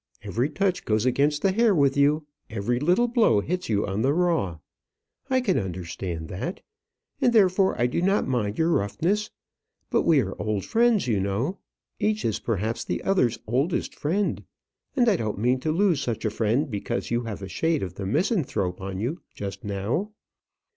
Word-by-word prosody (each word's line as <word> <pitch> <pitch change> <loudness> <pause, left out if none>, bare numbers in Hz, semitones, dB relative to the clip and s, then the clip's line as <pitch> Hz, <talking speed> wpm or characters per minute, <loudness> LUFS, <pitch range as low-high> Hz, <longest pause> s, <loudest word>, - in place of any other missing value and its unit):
Every 115 +7 -1
touch 185 +4 0
goes 110 +1 +1
against 145 +4 +2
the 195 - +4
hair 220 0 +3
with 140 -3 +3
you; 145 +2 +3 0.2
every 115 +2 -1
little 180 - +3
blow 230 - +3
hits 180 - -3
you 105 -2 +1
on 100 +1 -2
the 140 +4 +2
raw. 165 - +1 0.7
I 260 -1 +3
can 200 -8 +1
understand 85 -2 -5
that; 100 - -5 0.6
and 250 -2 +4
therefore 190 -3 +4
I 120 - +3
do 125 +7 0
not 195 +3 +2
mind 115 -5 -1
your 165 +1 +2
roughness. 170 - 0 0.6
But - - +3
we 160 -4 +4
are 95 -5 -3
old 105 -2 -1
friends, 230 - +3
you 110 -5 +1
know. 105 - -1 0.4
Each 215 0 0
is 110 - 0
perhaps 110 0 -2
the - - -3
other's 125 - +2
oldest 135 +10 0
friend; 190 +7 -1 0.5
and 245 -3 +3
I 205 -5 +4
don't 110 -7 -3
mean 125 +5 +2
to 155 +4 -1
lose 175 -3 +2
such 120 -3 -3
a 110 - +1
friend 115 +7 0
because 110 +4 -3
you 120 0 0
have 105 -3 -5
a - - -4
shade 160 +5 0
of 90 -2 -5
the 95 0 -5
misanthrope 120 - 0
on 95 0 -4
you 125 - -3
just 100 0 -6
now. 105 - -2
130 Hz, 180 wpm, -25 LUFS, -, 0.7 s, the